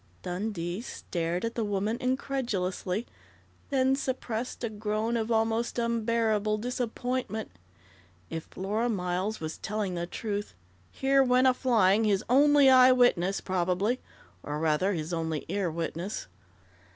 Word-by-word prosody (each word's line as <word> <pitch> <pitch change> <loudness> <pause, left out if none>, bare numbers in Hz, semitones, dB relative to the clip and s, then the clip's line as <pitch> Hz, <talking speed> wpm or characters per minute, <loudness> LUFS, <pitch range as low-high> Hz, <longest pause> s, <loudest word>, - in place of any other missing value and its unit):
_" - - -32
Dundee 180 0 -3
stared 175 -6 -3
at 230 - -3
the 230 - -1
woman 205 +2 -1
incredulously, 235 -6 -1 0.6
then 265 -1 +3
suppressed 250 -3 -3
a 235 - 0
groan 215 +2 -1
of 225 -1 -1
almost 225 +1 +1
unbearable 225 -2 +1
disappointment. 245 -1 -3 0.8
If 160 -1 -5
Flora 210 +5 -2
Miles 185 +1 -1
was 155 0 -5
telling 210 -3 -2
the 175 0 -3
truth, 205 - -4 0.4
here 270 - +3
went 255 0 +4
a 260 - +6
flying 225 -5 +3
his 205 -1 +2
only 290 +1 +6
eye 255 -1 +8
witness, 200 -7 +3
probably, 185 +6 0 0.4
or 145 0 -4
rather, 160 +5 +1
his 160 0 -3
only 160 -2 -2
ear 200 -3 -1
witness. 170 +4 -4
215 Hz, 130 wpm, -28 LUFS, 185-245 Hz, 0.8 s, eye